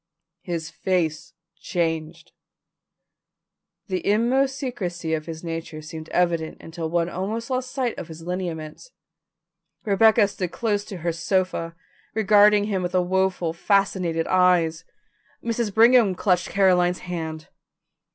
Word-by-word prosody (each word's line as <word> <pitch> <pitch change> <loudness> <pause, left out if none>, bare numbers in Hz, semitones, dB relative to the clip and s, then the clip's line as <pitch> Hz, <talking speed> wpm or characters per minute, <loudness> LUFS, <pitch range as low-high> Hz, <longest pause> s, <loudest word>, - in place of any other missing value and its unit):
His 165 -3 -4
face 170 -3 -1 0.3
changed. 165 -1 -3 1.5
The 185 -3 -3
inmost 255 +6 +2
secrecy 175 - -3
of 155 0 -2
his 160 0 -7
nature 165 -2 -5
seemed 155 +1 -9
evident 170 -3 0
until 165 0 -6
one 170 0 +1
almost 215 +8 -4
lost 255 0 -1
sight 255 -4 -2
of 170 - -7
his 165 -1 -10
lineaments. 175 - -5 1.0
Rebecca 215 +1 +5
stood 185 -3 -4
close 205 -1 -1
to 195 - -7
her 170 - +2
sofa, 170 0 -1 0.4
regarding 210 -1 +5
him 200 -3 -1
with 180 0 -3
woeful, 185 -2 +1
fascinated 180 -3 +1
eyes. 175 -3 +2 0.6
Mrs. 230 -2 -1
Brigham 225 -2 +5
clutched 180 -2 +1
Caroline's 180 -2 +3
hand. 160 -3 -5
180 Hz, 120 wpm, -24 LUFS, 165-205 Hz, 1.5 s, Rebecca